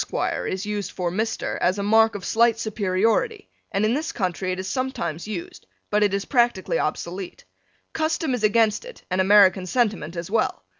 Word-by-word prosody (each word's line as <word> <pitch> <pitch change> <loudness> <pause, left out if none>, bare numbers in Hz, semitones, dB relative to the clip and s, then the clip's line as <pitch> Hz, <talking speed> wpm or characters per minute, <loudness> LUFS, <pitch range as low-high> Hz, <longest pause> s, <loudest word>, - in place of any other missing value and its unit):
_ - - -1
is 190 +2 -3
used 210 -1 -3
for 175 -2 -3
Mr. 220 +5 -2
as 185 +3 +1
a 200 - -2
mark 220 +2 +4
of 195 - -6
slight 230 0 +3
superiority 225 - 0 0.2
and 200 +2 +1
in 220 - +2
this 310 +4 -2
country 185 -3 -2
it 185 - -3
is 190 - -4
sometimes 240 - -3
used, 190 -6 -7 0.2
but 210 0 +2
it 205 -2 +3
is 200 0 -2
practically 240 -3 +1
obsolete. 185 -2 -4 0.5
Custom 315 -2 0
is 245 -3 -2
against 215 - +3
it - - -12
and 185 +1 +2
American 190 -1 +5
sentiment 205 -8 0
as 170 +2 -5
well. 220 0 0
210 Hz, 185 wpm, -23 LUFS, 185-235 Hz, 0.5 s, American